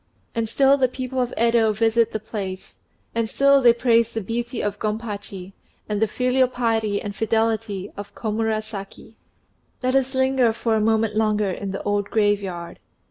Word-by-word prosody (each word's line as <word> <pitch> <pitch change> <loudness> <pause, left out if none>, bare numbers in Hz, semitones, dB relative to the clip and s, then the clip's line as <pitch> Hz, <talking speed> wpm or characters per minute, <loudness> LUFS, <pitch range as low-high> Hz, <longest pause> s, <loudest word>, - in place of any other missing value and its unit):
And 230 -2 -2
still 275 +3 +4
the 260 -2 +3
people 255 0 -3
of 245 - -1
Yedo 230 -2 +3
visit 225 +1 +2
the 220 - -3
place, 195 -3 -6 0.4
and 230 -1 -1
still 275 +2 +4
they 240 -2 +7
praise 235 -1 +2
the 225 - -3
beauty 235 +3 -3
of 205 0 -2
Gompachi 205 -3 -5 0.3
and 210 0 -2
the 220 - +4
filial 255 +3 +2
piety 225 -4 0
and 205 -1 -6
fidelity 220 -3 -1
of 205 0 -9
Komurasaki. 215 -2 -3 0.7
Let 255 0 +1
us 265 0 +1
linger 260 -3 +3
for 230 0 -1
a 220 - +2
moment 220 0 +1
longer 215 -2 +1
in 195 +2 -5
the 195 - -5
old 205 -1 -1
graveyard. 200 -5 -1
220 Hz, 165 wpm, -23 LUFS, 205-235 Hz, 0.7 s, they